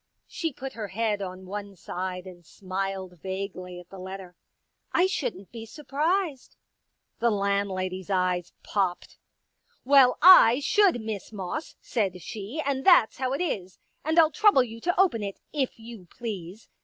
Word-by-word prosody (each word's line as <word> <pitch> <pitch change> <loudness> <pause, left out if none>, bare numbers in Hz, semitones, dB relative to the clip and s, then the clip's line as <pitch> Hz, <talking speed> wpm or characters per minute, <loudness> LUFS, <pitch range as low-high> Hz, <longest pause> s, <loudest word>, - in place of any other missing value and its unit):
She 330 -3 -3
put 265 0 -7
her 215 -2 -5
head 210 +1 -1
on 185 0 -6
one 200 +1 -6
side 180 +1 -5
and 180 -2 -12
smiled 190 0 -5
vaguely 190 -2 -5
at 180 - -15
the 195 - -10
letter. 185 -1 -8 0.3
" - - -52
I 360 - +3
shouldn't 245 - -3
be 230 -1 -8
sur 300 +7 -12
prised." 310 0 -1 0.6
The 235 - +3
landlady's 195 -3 -1
eyes 180 -2 0
popped. 190 -4 -2 0.3
" - - -52 0.3
Well, 270 -2 +6
I 305 -8 +8
should, 365 - +3
Miss 220 -2 -5
Moss," 210 - -5
said 195 -6 -1
she, 220 +8 -6
'* - - -8
and 270 -1 -1
that's 350 - +5
how 260 -1 -1
it 280 - -2
is. 190 - -3 0.3
And 315 +2 -1
I'll 320 -2 +6
trouble 410 - +5
you 230 -1 -9
to 350 +5 0
open 350 - +3
it, 200 -1 -5
if 275 -4 -1
you 225 -5 -11
please. 205 -3 -7
210 Hz, 165 wpm, -27 LUFS, 185-270 Hz, 0.6 s, I